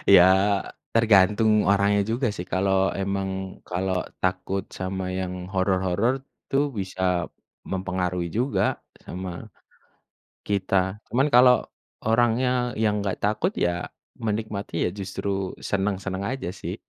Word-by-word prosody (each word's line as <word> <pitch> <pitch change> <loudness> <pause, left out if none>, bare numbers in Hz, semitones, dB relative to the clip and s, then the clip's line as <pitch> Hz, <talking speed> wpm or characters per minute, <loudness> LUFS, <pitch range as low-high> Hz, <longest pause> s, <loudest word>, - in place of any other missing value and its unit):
Ya, 90 - +9 0.7
tergantung 110 -1 +5 0.2
orangnya 100 +1 +3
juga 120 +3 +1
sih, 90 - -5
kalau 95 +1 +2
emang, 95 0 -1 0.4
kalau 95 +1 -1 0.2
takut 95 +1 -1 0.2
sama 95 0 -3 0.2
yang 90 -1 -3 0.2
horor-horor, 95 +4 +1 0.4
tu 135 - +1 0.2
bisa 95 -2 -1 0.4
mempengaruhi 90 -2 -1
juga 130 +3 +1 0.4
sama 95 +1 -5 1.2
kita. 95 0 0
Cuman 135 +5 +3
kalau 125 0 +8 0.5
orangnya 120 +2 +3 0.3
yang 105 -1 +3
enggak 100 -1 -2
takut, 110 - +1
ya 85 0 -1 0.3
menikmati, 105 -1 -3
ya - - +2
justru 100 +1 -4 0.4
senang-senang 95 -1 -1
aja 135 -9 -4
sih. - - -4
95 Hz, 110 wpm, -25 LUFS, 95-110 Hz, 1.2 s, Ya